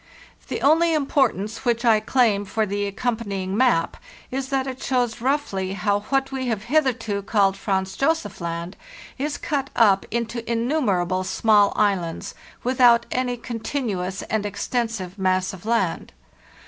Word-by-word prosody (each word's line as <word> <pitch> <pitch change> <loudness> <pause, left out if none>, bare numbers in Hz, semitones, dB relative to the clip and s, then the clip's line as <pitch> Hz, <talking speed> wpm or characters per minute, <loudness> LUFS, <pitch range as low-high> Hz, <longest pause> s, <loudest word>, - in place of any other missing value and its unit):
The - - -4
only 325 +3 +4
importance 265 -8 0
which 240 -1 0
I 220 -2 +5
claim 215 -3 +2
for 215 +2 -1
the 205 0 -2
accompanying 200 -3 -2
map 235 -8 +2 0.3
is 265 +1 -3
that 270 -1 0
it 260 -1 -6
shows 245 -3 0
roughly 235 -9 -1
how 200 +1 +1
what 270 0 +1
we 260 -1 -3
have 220 -4 -2
hitherto 235 -6 0
called 200 -1 +2
Franz 190 -2 -2
Josef 270 - -1
Land 170 +2 -4 0.4
is 290 +2 -2
cut 275 -3 -2
up 200 -4 +4
into 235 +1 -2
innumerable 220 - 0
small 205 +1 +3
islands, 190 -6 0 0.3
without 245 -2 +5
any 250 -1 -1
continuous 225 -5 -3
and 220 -2 -1
extensive 210 -2 -3
mass 185 0 +1
of 190 +3 -10
land. 225 -7 0
225 Hz, 140 wpm, -23 LUFS, 195-255 Hz, 0.4 s, I